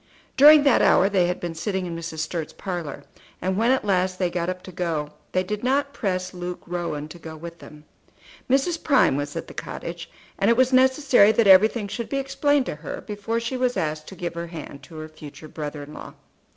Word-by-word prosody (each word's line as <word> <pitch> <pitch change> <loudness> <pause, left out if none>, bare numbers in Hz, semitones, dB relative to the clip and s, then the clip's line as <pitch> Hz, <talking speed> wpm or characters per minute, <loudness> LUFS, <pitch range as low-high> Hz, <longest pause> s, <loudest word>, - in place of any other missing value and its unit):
During 295 +2 +8
that 280 -4 +4
hour 195 - +5
they 185 -3 +2
had 180 - -2
been 175 -1 -4
sitting 190 +3 -2
in 170 -1 -5
Mrs. 165 -1 -5
Sturt's 160 0 -4
parlour; 170 -7 -5 0.4
and 185 +1 -1
when 225 +4 +2
at 260 -4 +2
last 185 -2 +1
they 180 -2 0
got 175 0 -2
up 185 0 -5
to 185 - -10
go 165 -4 -2 0.2
they 185 - +1
did 210 +3 -4
not 280 +2 +1
press 185 -7 -2
Luke 180 0 -6
Rowan 170 -4 -4
to 175 - -11
go 160 -1 -9
with 170 +1 -9
them. 150 0 -14 0.6
Mrs. 280 +6 +1
Prime 275 - +4
was 145 +1 -3
at - - -4
the - - -12
cottage, - - -7 0.3
and 200 - +3
it 230 - +4
was 260 0 +3
necessary 260 -4 +5
that 230 - +3
everything 205 +3 +5
should 235 +3 -5
be 275 - -1
explained 275 +1 +1
to 150 - -5
her 150 - -6
before 210 +2 -3
she 235 +3 -3
was 250 -1 0
asked 155 0 -2
to 190 - -9
give 175 -1 -4
her 170 0 -5
hand 155 -4 -9
to 160 +4 -14
her 155 0 -6
future 155 0 -12
brother 150 -1 -6
in 145 +1 -11
law. - - -10
185 Hz, 220 wpm, -24 LUFS, 165-235 Hz, 0.6 s, During